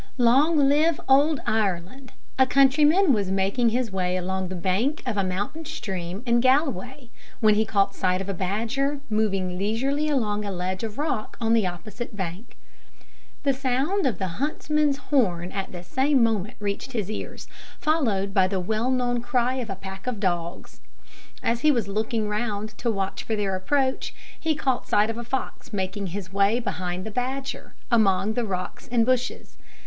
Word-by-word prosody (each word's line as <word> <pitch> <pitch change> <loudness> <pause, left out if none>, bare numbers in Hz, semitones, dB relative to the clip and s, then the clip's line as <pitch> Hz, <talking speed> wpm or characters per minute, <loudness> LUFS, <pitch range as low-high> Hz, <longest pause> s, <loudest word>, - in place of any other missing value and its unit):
Long 270 +7 +4
live 295 +3 +3
Old 280 +2 +4
Ireland! 215 +5 -1 0.3
A 260 - +6
countryman 295 +6 +5
was 200 -4 0
making 195 +5 +2
his 240 -1 -1
way 185 -1 0
along 190 +1 -2
the 185 - -5
bank 195 - 0
of 245 -4 -1
a 200 - +1
mountain 200 - -3
stream 190 - -5
in 235 -1 +3
Galway, 260 - +1 0.3
when 215 -1 +5
he 215 +1 +2
caught 200 -2 +1
sight 185 0 +1
of 195 - -5
a 200 - -1
badger 230 +10 -1
moving 195 -4 0
leisurely 270 +9 0
along 210 -7 0
a 200 - -3
ledge 185 +2 -3
of 220 -1 -4
rock 290 -7 -2
on 225 -1 +2
the 220 -5 +3
opposite 210 +6 -6
bank. 190 +4 -6 0.9
The 280 -1 +3
sound 270 +8 0
of 225 -8 -1
the 190 - -2
huntsman's 300 -1 +1
horn 190 - +1
at 195 -1 -4
the 175 -1 -8
same 265 +6 +2
moment 215 -3 0
reached 205 +5 -3
his 215 -3 -2
ears, - - -6 0.3
followed 220 -11 +1
by 190 -1 +4
the 190 0 -1
well 220 +6 -1
known 245 -2 +1
cry 240 +1 +1
of 240 -4 -4
a 195 - -3
pack 190 +2 -9
of 245 -4 -2
dogs. 175 -3 -3 0.6
As 230 0 +1
he 305 - +4
was 235 -8 +2
looking 215 +2 -1
round, 210 0 -2
to 240 - 0
watch 195 -3 -2
for 225 - -1
their 200 -2 -1
approach, 265 +7 0 0.2
he 320 -1 0
caught 265 -4 -1
sight 210 +2 +3
of 225 - -7
a - - -4
fox 250 0 -4
making 195 0 -2
his 185 +1 -6
way 200 +4 +3
behind 185 -4 -3
the 220 - -5
badger, 260 +4 -4 0.2
among 205 -2 +3
the 240 +1 -1
rocks 185 -3 -5
and 235 -2 +3
bushes. 255 +1 -1
220 Hz, 175 wpm, -25 LUFS, 195-260 Hz, 0.9 s, A